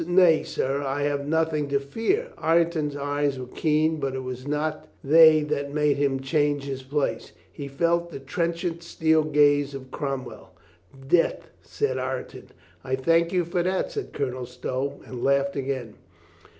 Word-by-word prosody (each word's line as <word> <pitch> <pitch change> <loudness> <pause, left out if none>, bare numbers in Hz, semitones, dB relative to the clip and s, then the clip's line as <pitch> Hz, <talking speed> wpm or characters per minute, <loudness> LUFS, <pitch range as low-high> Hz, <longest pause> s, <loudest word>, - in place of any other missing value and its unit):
"Nay, 175 -3 +5
sir, 135 +2 -2
I 140 +1 -2
have 145 -1 -1
nothing 160 -1 +1
to 140 0 +1
fear." 230 - -1
Ireton's 165 -3 +1
eyes 145 -1 -1
were 130 - -5
keen, 155 +4 +1
but 135 -2 -2
it 130 - -4
was 130 +1 -6
not 150 +1 -2 0.2
they 155 +1 +7
that 145 -1 -3
made 150 -2 +2
him 140 -2 0
change 145 +1 +1
his 135 -1 -5
place. 140 +2 -2 0.2
He 140 - -6
felt 170 +5 0
the - - -7
trenchant 170 +4 -2
steel 160 -2 +2
gaze 145 -2 +3
of 130 -1 -9
Crom 135 -3 -3
well. - - -12 0.5
"Death," 170 +3 +1
said 435 - -2
Ireton. - - -5 0.4
"I 130 0 -1
thank 165 +5 +2
you 180 -2 +1
for 175 +1 -1
that," 185 +2 -1
said 420 -2 -5
Colonel 130 -3 -3
Stow, 130 +3 -4
and 125 -2 -7
laughed 140 0 +2
again. 130 -5 -3
145 Hz, 165 wpm, -25 LUFS, 135-160 Hz, 0.5 s, they